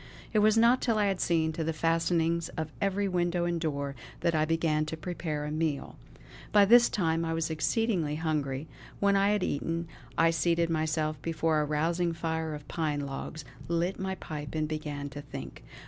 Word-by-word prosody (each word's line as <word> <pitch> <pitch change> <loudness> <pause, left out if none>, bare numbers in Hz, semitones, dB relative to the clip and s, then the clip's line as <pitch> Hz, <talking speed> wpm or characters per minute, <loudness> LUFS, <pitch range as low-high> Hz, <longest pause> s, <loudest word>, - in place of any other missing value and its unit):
It 215 - +4
was 215 +1 +4
not 235 +3 +5
till 230 -3 +1
I 210 - +3
had 195 -2 0
seen 160 -2 +2
to 160 - -2
the 165 +1 -1
fastenings 165 +1 +1
of 160 -1 -3
every 200 0 +1
window 175 -1 0
and 170 -1 -1
door, 140 -3 -2 0.3
that 170 - +2
I 155 -1 +2
began 160 -1 +1
to 160 - -4
prepare 155 -3 -3
a 150 - -4
meal. 155 -2 -2 0.6
By 205 -1 +7
this 235 +3 +7
time 165 -4 +1
I 165 0 -1
was 165 0 -1
exceedingly 165 -1 0
hungry; 150 -3 -2 0.3
when 200 0 +3
I 195 +1 +4
had 210 -2 +1
eaten 165 +3 -2 0.3
I 165 0 +5
seated 170 0 +1
myself 155 -1 0
before 160 -1 +1
a - - 0
rousing 165 +3 0
fire 160 -1 -2
of 145 -1 -10
pine 150 -3 -1
logs, 140 +2 -6 0.2
lit 170 +3 0
my 190 0 -2
pipe, 150 -4 -7
and 155 -1 0
began 150 -2 -4
to 145 +1 -7
think. 140 - -8
165 Hz, 190 wpm, -29 LUFS, 155-175 Hz, 0.6 s, By